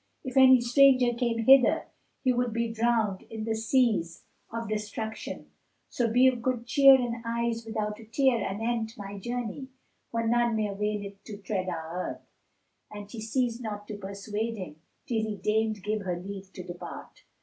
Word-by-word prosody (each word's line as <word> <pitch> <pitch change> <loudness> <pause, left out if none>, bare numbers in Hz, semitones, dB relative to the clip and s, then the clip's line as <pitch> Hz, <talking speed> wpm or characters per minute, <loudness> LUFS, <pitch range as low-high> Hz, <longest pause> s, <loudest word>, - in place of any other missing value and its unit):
If 260 0 -6
any 260 -1 +8
stranger 250 0 +5
came 235 -2 -1
hither, 265 0 +6 0.4
he 255 -2 +3
would 245 -1 0
be 230 0 -1
drowned 225 -4 +1
in 220 -1 -5
the 225 0 -1
seas 220 -7 +1 0.3
of 230 0 -4
destruction: 215 +1 -5 0.4
so 235 -3 0
be 250 +3 +5
of 255 -2 +3
good 245 -1 -1
cheer 275 +2 +7
and 240 -2 -1
eyes 230 0 -2
without 210 -1 -3
a 225 - -12
tear 240 -1 +2
anent 225 +2 -2
my 200 -1 -7
journey; 245 +4 -4 0.4
for 230 0 -1
none 235 0 +2
may 215 -1 0
avail 205 0 -2
to 210 - -7
tread 190 -2 -3
our 165 -2 -5 0.2
earth." - - -17 0.7
And 205 -1 -9
she 225 - -7
ceased 235 +1 -1
not 205 -2 -6
to 210 - -4
persuade 205 +3 -4
him, 180 -6 -7 0.3
till 225 -3 0
he 215 -1 -3
deigned 215 +1 0
give 210 +1 -1
her 180 -3 -2
leave 195 +1 -8
to 185 - -7
depart. 175 0 -9
225 Hz, 170 wpm, -28 LUFS, 205-240 Hz, 0.7 s, any